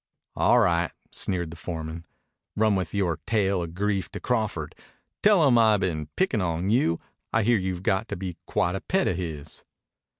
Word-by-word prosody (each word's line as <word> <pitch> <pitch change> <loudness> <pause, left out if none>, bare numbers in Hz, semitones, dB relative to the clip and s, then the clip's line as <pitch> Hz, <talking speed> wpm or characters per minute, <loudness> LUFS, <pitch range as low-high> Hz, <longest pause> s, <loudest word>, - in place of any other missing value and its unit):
"All - - +4
right," 85 -1 +3 0.2
sneered 85 -4 -2
the - - -8
foreman. 80 0 -6 0.5
"Run 110 0 +3
with 95 -4 -1
yore 90 -6 0
tale 100 -4 +1
of 85 0 -6
grief 100 -3 -1
to - - -4
Crawford. 110 - -1 0.5
Tell 200 -8 +5
him 120 -3 +5
I 110 -2 +5
been 85 -6 -2
pickin' 185 - +1
on 85 +2 -1
you. 85 -9 +2 0.3
I 110 - +2
hear 115 0 +3
you've 95 -1 -3
got 95 +3 +1
to - - -4
be 90 -1 -5
quite 95 -4 +1
a 95 - -3
pet 190 0 +1
of 85 - 0
his." 80 -4 -6
95 Hz, 180 wpm, -26 LUFS, 85-110 Hz, 0.5 s, Tell